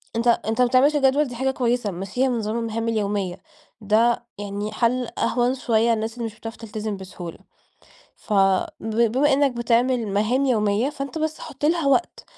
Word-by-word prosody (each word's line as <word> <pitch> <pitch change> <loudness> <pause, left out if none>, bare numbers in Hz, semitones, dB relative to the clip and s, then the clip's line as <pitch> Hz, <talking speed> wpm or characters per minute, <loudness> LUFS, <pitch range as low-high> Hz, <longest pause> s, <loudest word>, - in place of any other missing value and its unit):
أنت 230 +1 0
أنت 230 0 +2
ما 250 - +5
بتعملش 265 +4 +4
جدول 280 +1 +3
دي 245 -3 -7
حاجة 265 +2 0
كويسة 240 -4 0
مشيها 195 +8 -1
بنظام 225 -2 -2
المهام 230 0 -3
اليومية، 200 -4 -1 0.4
ده 225 +3 +2
يعني 205 +1 -4
حَلّ 240 +2 0
أهوَن 245 +1 +1
شوية 230 -2 +2
للناس 220 0 -2
اللي 235 0 -5
مش 225 -1 -6
بتعرف 225 +1 -7
تلتزم 215 -2 -5
بسهولة، 185 -3 -8 0.8
ف - - -8 0.5
ب 220 0 -4 0.2
بما 285 +3 +3
إنّك 280 0 +3
بتعمل 240 0 +1
مهام 215 +7 +1
يومية، 215 +1 +1
فأنت 275 +2 -5
بس 315 0 -2
حُط 295 -1 -8
لها 325 0 +2
وقت، 275 +6 +1
235 Hz, 170 wpm, -23 LUFS, 215-260 Hz, 0.8 s, ما